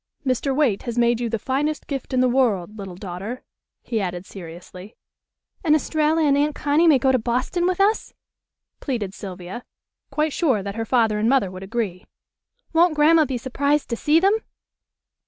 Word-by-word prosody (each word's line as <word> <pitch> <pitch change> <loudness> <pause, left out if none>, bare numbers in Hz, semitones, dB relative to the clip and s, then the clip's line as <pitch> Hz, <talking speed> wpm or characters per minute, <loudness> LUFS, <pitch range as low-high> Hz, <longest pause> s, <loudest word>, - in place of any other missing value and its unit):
"Mr. 260 +1 0
Waite 265 -9 +2
has 240 -2 -5
made 235 -1 +3
you 240 -1 -2
the 225 - -1
finest 280 +6 -2
gift 275 -2 -5
in 255 -1 +2
the 255 - +4
world, 215 -7 +1
little 195 -4 -8
daughter," 195 +6 -6 0.4
he 225 -3 -2
added 180 -1 -4
seriously. 180 +2 -11 0.7
"And 305 -3 +4
Estralla 310 +1 +1
and 285 -2 +4
Aunt 295 +1 +1
Connie 300 +4 +2
may 305 -4 +6
go 265 +1 +2
to 255 - +2
Boston 255 +10 -1
with 370 0 -1
us?" 415 +3 +2 0.7
pleaded 225 -9 -3
Sylvia, 190 +3 -8 0.5
quite 300 +1 0
sure 260 - +1
that 200 0 -4
her 225 +1 -3
father 225 -3 +2
and 220 +2 +2
mother 255 -9 +2
would 185 0 -9
agree. 195 -3 -4 0.7
"Won't 330 0 +4
Grandma 310 +1 +5
be 260 -2 -3
surprised 280 +3 -1
to - - +1
see 300 +7 +3
them?" 390 +4 +4
250 Hz, 175 wpm, -22 LUFS, 205-295 Hz, 0.7 s, may